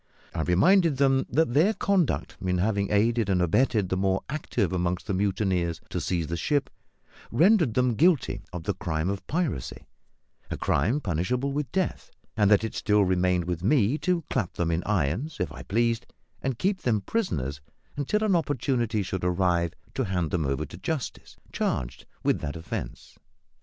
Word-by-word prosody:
I 85 - -2
reminded 160 - +4
them 135 -1 +3
that 160 -5 +2
their 180 - +4
conduct 190 -6 0
in 90 -1 +1
having 100 +1 0
aided 110 +1 +2
and 95 -2 +2
abetted 95 +3 +2
the 95 - 0
more 95 0 +1
active 120 - -1
among 90 0 0
the - - -2
mutineers 95 -3 0
to - - -2
seize 85 -3 -1
the 85 - -3
ship 140 - 0 0.6
rendered 165 - +4
them 125 -1 +3
guilty 160 - +2
of 90 -2 -6
the - - -1
crime 85 0 -2
of 100 - -6
piracy 150 - -2 0.6
a - - -3
crime 130 +9 +1
punishable 120 - -1
with 140 -3 -3
death 190 -1 -2 0.3
and 105 -2 +3
that 105 0 +5
it 110 - -3
still 105 -1 +2
remained 90 -1 +1
with 85 -1 -3
me 125 +4 +3
to 180 -3 0
clap 110 -9 -1
them 85 -1 -1
in 85 +1 0
irons, 105 - 0
if - - -1
I - - -9
pleased, 115 +2 0 0.3
and 130 -3 -2
keep 190 - 0
them 110 -4 +1
prisoners 70 - -2 0.3
until 145 +10 0
an 205 -4 +3
opportunity 125 -8 0
should 95 -1 -4
arrive 90 -2 +1 0.2
to 130 - -1
hand 90 -5 -1
them 80 -5 0
over 70 -1 -1
to - - -11
justice, 155 -5 -5 0.2
charged 60 +1 -2 0.2
with - - +2
that 75 0 -4
offence. 80 -1 -7
105 Hz, 175 wpm, -27 LUFS, 90-140 Hz, 0.6 s, that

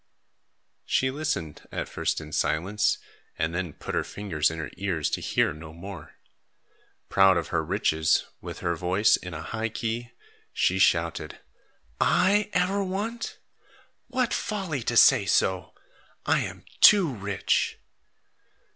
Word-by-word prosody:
She 130 0 +1
listened 135 - -4
at - - -3
first - - -2
in 75 0 -10
silence, 95 +8 +1 0.4
and 80 +1 -1
then 90 -3 -3
put - - -7
her - - +1
fingers 85 -7 -1
in 80 - -6
her 80 - -5
ears 90 -5 -1
to - - -2
hear - - +1
no 80 +1 -11
more. 85 -2 -10 0.9
Proud 95 -2 +5
of 85 -3 -3
her 80 - 0
riches, 80 -3 +1 0.2
with - - -8
her 85 0 0
voice 90 +5 +3
in 90 -2 -7
a 75 - -6
high 110 +5 -3
key, 115 +2 -4 0.4
she 95 +1 +1
shouted, 85 -2 +1 0.6
"I 205 +2 +3
ever 190 +3 +1
want? 210 +5 -4 0.7
What 255 -2 0
folly 190 - -2
to 120 - 0
say 115 -7 +6
so! 95 0 +1 0.5
I - - +3
am - - -6 0.2
too 200 -4 +8
rich." 100 -3 -1
95 Hz, 140 wpm, -26 LUFS, 85-135 Hz, 0.9 s, too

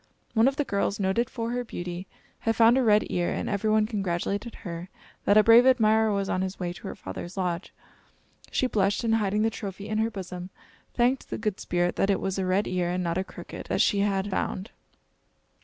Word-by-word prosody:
One 225 +2 +4
of 270 - +1
the 290 - +1
girls, 200 -4 -1
noted 200 +5 +1
for 230 -1 -3
her 245 0 -1
beauty, 175 -4 -6 0.3
had 225 0 0
found 230 +1 +6
a 265 - +3
red 215 -3 +4
ear, 175 -1 0
and - - -3
every 205 +1 0
one 215 0 +4
congratulated 200 +1 -2
her 170 +1 -6 0.4
that 205 - +5
a 215 - +7
brave 235 +3 +7
admirer 220 -3 +4
was 200 -1 0
on 185 - 0
his 190 +1 -4
way 175 -2 -2
to - - -9
her - - -5
father's 175 - -8
lodge. 180 -1 -2 0.8
She - - +1
blushed, 205 -3 +1
and 225 -1 +2
hiding 210 0 +1
the 225 - +2
trophy 200 -1 -6
in 215 0 -1
her 220 +1 +2
bosom, 185 -3 -7 0.5
thanked 250 +2 +1
the - - -3
Good 215 -3 -2
Spirit 175 0 0
that 195 - +2
it 200 - +2
was 195 0 -2
a 185 - -1
red 190 +3 +2
ear, 180 -1 0
and 180 +1 -1
not 170 +1 -1
a - - 0
crooked, - - -9
that - - +1
she 200 - +3
had 200 -1 +1
found. 190 +1 -2
200 Hz, 220 wpm, -27 LUFS, 185-225 Hz, 0.8 s, a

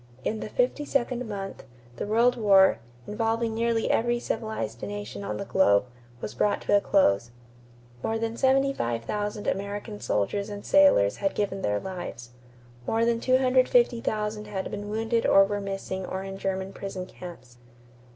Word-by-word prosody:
In 220 - -2
the - - -5
fifty - - 0
second 250 -4 -1
month, 195 -2 -6 0.3
the - - -3
World 235 +3 +3
War, 200 -4 +5 0.3
involving 225 +1 -1
nearly 230 0 +1
every 240 +1 +1
civilized 120 - -4
nation 205 0 -6
on - - -3
the 200 - -4
globe, 100 - +3 0.4
was 105 - -5
brought 205 - +1
to - - +2
a 200 - +4
close. 120 - +3 0.7
More 225 +8 -1
than 225 0 -2
75,000 210 - 0
American 205 +2 -3
soldiers 200 - -1
and 205 -1 -7
sailors 285 - +5
had 195 -1 -1
given 195 -1 -1
their 105 0 0
lives. 175 - -7 0.6
More 225 +1 +2
than 235 0 +1
250,000 250 - +2
had 195 -2 -4
been 205 0 -5
wounded 225 +2 0
or 195 - +7
were 205 +1 -3
missing 195 -1 -4
or 190 0 -4
in 195 0 -7
German 190 0 -3
prison 195 -2 -6
camps. 165 -10 -11
205 Hz, 150 wpm, -27 LUFS, 190-230 Hz, 0.7 s, or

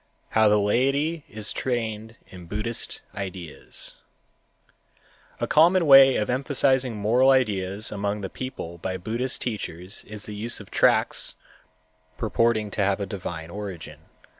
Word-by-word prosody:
How 110 -1 +4
the 105 - +4
Laity 135 +9 +1
is 105 0 -5
Trained 115 -3 -3
in 90 -2 -12
Buddhist 105 +5 -2
Ideas_ 95 -5 -6 1.4
A - - 0
common 170 +3 +4
way 135 -2 +8
of 105 - 0
emphasizing 130 -1 +1
moral 115 +6 +3
ideas 105 -5 +1
among 100 0 -2
the 95 - -3
people 85 -9 -7
by 95 +2 -3
Buddhist 115 +7 -3
teachers 100 -5 -4
is 105 -1 -6
the 105 - -7
use 110 +3 -1
of - - -13
tracts - - +2 0.8
purporting 110 -1 +1
to 100 - 0
have 100 0 +1
a 100 - -2
divine 85 -5 -6
origin. 100 -4 -7
110 Hz, 135 wpm, -25 LUFS, 100-125 Hz, 1.4 s, way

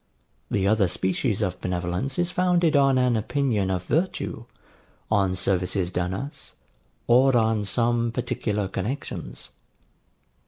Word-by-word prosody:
The 95 0 +1
other 105 -2 +3
species 95 +5 0
of 90 -2 -3
benevolence 90 +8 -2
is 175 0 0
founded 180 -3 +2
on 135 -2 +4
an 125 -2 +3
opinion 110 -3 0
of 90 -1 -1
virtue, 170 - -2 0.7
on 100 -3 +2
services 90 0 0
done 90 0 -1
us, 140 +9 -7 0.5
or 125 +1 +5
on 110 -2 +1
some 120 +2 +1
particular 105 -4 -2
connexions. 95 - -5
110 Hz, 120 wpm, -25 LUFS, 95-130 Hz, 0.7 s, or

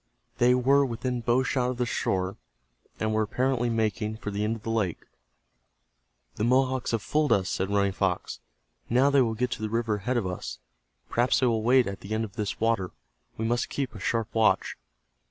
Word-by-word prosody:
They 125 +1 +5
were 135 +3 +4
within 125 0 -2
bow 120 +3 +2
shot 125 -1 0
of 125 - -3
the 125 - 0
shore, 95 -4 -1 0.6
and 110 0 0
were 110 - +2
apparently 125 +2 0
making 110 -1 -1
for 105 -2 -5
the 100 +1 -2
end 110 +2 0
of 110 - -11
the 115 - -3
lake. 100 -7 -1 1.3
"The 105 - -1
Mohawks 130 +1 +2
have 115 -3 -1
fooled 150 -1 +1
us," 95 -2 +2
said 95 +1 -1
Running 100 -1 +2
Fox. - - -2 0.5
"Now 130 +4 +4
they 140 -1 +5
will 115 -3 +1
get 125 +2 -1
to - - -4
the 110 - -2
river 115 -1 0
ahead 125 +5 -1
of 115 - 0
us. 90 -1 -5 0.5
Perhaps 120 +2 +2
they - - +4
will 115 -3 +2
wait 125 +2 +4
at 100 -1 -5
the 105 +3 -4
end 110 - 0
of 105 -3 -7
this 105 -2 -3
water. 110 -5 +1 0.5
We 110 - -2
must 120 +1 0
keep 135 -3 -3
a - - -9
sharp 115 -2 -1
watch." 110 -4 +2
115 Hz, 205 wpm, -27 LUFS, 105-125 Hz, 1.3 s, They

